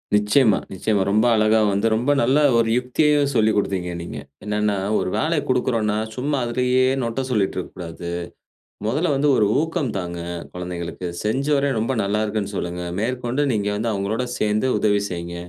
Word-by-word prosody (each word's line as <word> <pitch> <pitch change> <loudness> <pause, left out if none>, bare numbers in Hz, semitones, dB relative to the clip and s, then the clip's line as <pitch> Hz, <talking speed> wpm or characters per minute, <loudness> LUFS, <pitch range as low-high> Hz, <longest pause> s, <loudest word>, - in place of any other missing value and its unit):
நிச்சயமா, 105 +2 +4 0.2
நிச்சயமா 100 +1 0
ரொம்ப 110 +3 +3
அழகா 110 0 +4
வந்து 100 +3 +1
ரொம்ப 125 +6 +1
நல்ல 130 +5 +3 0.2
ஒரு 115 -1 +2
யுக்தியையும் 145 +3 +2
சொல்லிக் 110 -1 +3
குடுத்தீங்க 95 -3 -1
நீங்க. 85 - -7 0.3
என்னன்னா 105 0 0 0.2
ஒரு - - -1
வேலை 160 +1 +1
கொடுக்கிறோம்னா, 115 -4 +1 0.2
சும்மா 140 +3 -1
அதிலேயே 125 +2 +2 0.2
நொட்ட 115 +3 -2
சொல்லிட்டு 105 -5 0
இருக்க 90 - -4
கூடாது. 85 0 -7 0.8
முதல்ல 150 +11 0
வந்து 140 +2 +2
ஒரு 105 - +4 0.2
ஊக்கம் 160 -7 -2
தாங்க 85 -2 -4 0.3
குழந்தைகளுக்கு, 90 0 -5 0.2
செஞ்சவரை 140 +6 +1
ரொம்ப 115 +4 -1
நல்லா 100 +2 0
இருக்குன்னு 105 -1 -3
சொல்லுங்க. 90 -1 -3 0.2
மேற்கொண்டு 125 +3 -1
நீங்க 105 -2 -1
வந்து 110 +2 -1
அவங்களோட 105 +5 -1 0.2
சேர்ந்து 105 +4 +1
உதவி 105 -1 +2
செய்யுங்க. 85 -1 -5
110 Hz, 155 wpm, -22 LUFS, 100-130 Hz, 0.8 s, நிச்சயமா